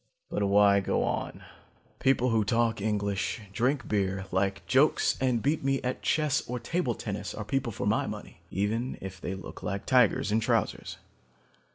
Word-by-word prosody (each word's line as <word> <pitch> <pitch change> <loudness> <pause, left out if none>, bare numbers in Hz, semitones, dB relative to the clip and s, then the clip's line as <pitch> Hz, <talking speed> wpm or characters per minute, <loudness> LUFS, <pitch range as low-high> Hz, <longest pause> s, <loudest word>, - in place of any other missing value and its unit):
"But - - -1
why 100 0 +5
go 95 - 0
on? - - -3 0.6
People 130 -1 +3
who 110 -2 +2
talk 115 0 +1
English, 100 -1 -1
drink 125 +3 0
beer, 95 -2 0
like 95 +1 0
jokes 135 +4 +3
and 125 -4 +1
beat 150 +2 +1
me 135 0 +1
at 125 0 -2
chess 150 -3 +1
or 125 0 -2
table 155 -4 -1
tennis 105 -2 -5
are 105 - -5
people 135 0 -1
for - - -4
my - - +1
money, - - -8
even 110 +6 -1
if 95 -2 -8
they 95 - -3
look 95 - -9
like 100 0 -3
tigers 125 -5 +3
in 110 - +3
trousers. 115 -1 -1
115 Hz, 170 wpm, -28 LUFS, 100-130 Hz, 0.6 s, why